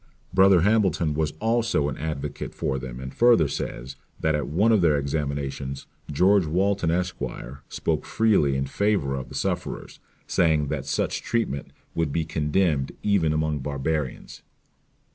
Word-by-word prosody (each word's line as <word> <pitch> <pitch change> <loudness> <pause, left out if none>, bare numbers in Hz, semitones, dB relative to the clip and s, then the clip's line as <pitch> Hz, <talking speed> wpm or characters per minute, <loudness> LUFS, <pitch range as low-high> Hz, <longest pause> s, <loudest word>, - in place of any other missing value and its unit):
Brother 95 -2 +6
Hambleton 95 -6 +2
was 75 0 -1
also 115 -9 +1
an 70 - -3
advocate 75 -2 -5
for 65 - -1
them; 65 -1 -7
and 65 0 -7
further 120 -10 +5
says, 65 -1 -5 0.2
that 80 - +1
at 75 -1 -1
one 100 +10 +2
of 110 -4 +4
their 80 -4 +4
examinations 70 -2 -3 0.3
George 90 +4 +4
Walton, 95 +2 +1
Esq.; 90 +1 -1 0.5
spoke - - -2
freely 100 -12 +2
in 70 - -1
favour 100 -3 0
of 65 -1 -5
the - - -9
sufferers, - - -3 0.3
saying, 80 -4 +2
that - - -3
such - - -1
treatment 110 - -2 0.2
would 80 -3 -1
be 80 +2 -1
condemned 75 -2 0
even 100 -7 +2
among 75 -1 0
barbarians. 70 0 -3
80 Hz, 145 wpm, -25 LUFS, 70-95 Hz, 0.5 s, Brother